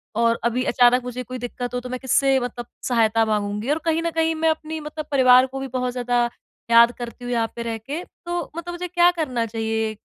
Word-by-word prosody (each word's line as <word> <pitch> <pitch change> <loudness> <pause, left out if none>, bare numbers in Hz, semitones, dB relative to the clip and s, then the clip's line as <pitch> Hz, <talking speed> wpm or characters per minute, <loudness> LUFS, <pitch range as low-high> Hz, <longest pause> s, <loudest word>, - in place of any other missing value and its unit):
और 230 0 +2
अभी 240 +2 +1
अचानक 250 -1 +4
मुझे 250 0 -5
कोई 255 +1 -7
दिक्कत 245 +1 -5
हो, 250 - -1
तो 250 0 -8
मैं 255 0 -4
किससे 270 +1 +3
मतलब 245 -1 -5 0.2
सहायता 225 -2 +3
माँगूँगी? 210 +2 -2
और 300 - +2
कहीं 325 0 +1
न 335 - 0
कहीं 325 0 +1
मैं 320 0 +2
अपनी 315 0 -3
मतलब 305 0 -6
परिवार 255 -2 +6
को 265 +1 -7
भी 270 - -4
बहुत 250 -1 -2
ज़्यादा 245 -1 0 0.4
याद 235 0 +7
करती 240 0 -8
हूँ 245 - -4
यहाँ 230 -2 +1
पे 235 - -5
रह 230 -1 -3
के, 280 +10 -6 0.2
तो 345 -2 -3
मतलब 345 +1 -5
मुझे 355 +1 -4
क्या 350 0 +4
करना 265 -9 -2
चाहिए? 225 0 -2
250 Hz, 225 wpm, -22 LUFS, 235-300 Hz, 0.4 s, याद